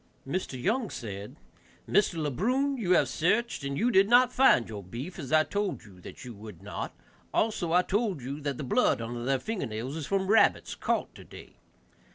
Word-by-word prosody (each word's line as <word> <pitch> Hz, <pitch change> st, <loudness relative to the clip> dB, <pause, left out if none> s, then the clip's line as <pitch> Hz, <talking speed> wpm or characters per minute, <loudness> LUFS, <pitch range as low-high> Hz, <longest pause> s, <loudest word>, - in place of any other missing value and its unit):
Mr. 140 Hz, -4 st, -3 dB
Young 220 Hz, -, 0 dB
said, 100 Hz, -3 st, -7 dB, 0.5 s
"Mr. 200 Hz, -2 st, +3 dB
Le 150 Hz, -3 st, -1 dB
Brun, 260 Hz, -, +1 dB
you 195 Hz, -8 st, +1 dB
have 145 Hz, -, +4 dB
searched 180 Hz, -, 0 dB
and 140 Hz, 0 st, -3 dB, 0.2 s
did 195 Hz, +2 st, +5 dB
not 245 Hz, +1 st, +5 dB
find 255 Hz, -, +5 dB
your 105 Hz, -2 st, -6 dB
beef, 125 Hz, -, -7 dB
as 140 Hz, -5 st, -6 dB
I 155 Hz, 0 st, +5 dB
told 205 Hz, +2 st, -2 dB
you 95 Hz, -4 st, -16 dB
that -, -, -10 dB
you 120 Hz, -, -7 dB
would 105 Hz, -3 st, -11 dB
not; 100 Hz, -, -5 dB, 0.4 s
also 205 Hz, -6 st, 0 dB
I 180 Hz, +1 st, +4 dB
told 205 Hz, -4 st, 0 dB
you 135 Hz, +3 st, -5 dB
that 140 Hz, -2 st, -3 dB
the -, -, -4 dB
blood 125 Hz, -, +2 dB
under 120 Hz, +1 st, -5 dB
their 135 Hz, +2 st, +1 dB
finger 190 Hz, -, -3 dB
nails 115 Hz, +6 st, -5 dB
is 155 Hz, -3 st, -5 dB
from 195 Hz, -1 st, 0 dB
rabbits 220 Hz, +3 st, +3 dB
caught -, -, -1 dB
today. -, -, -13 dB
155 Hz, 195 wpm, -28 LUFS, 120-205 Hz, 0.5 s, did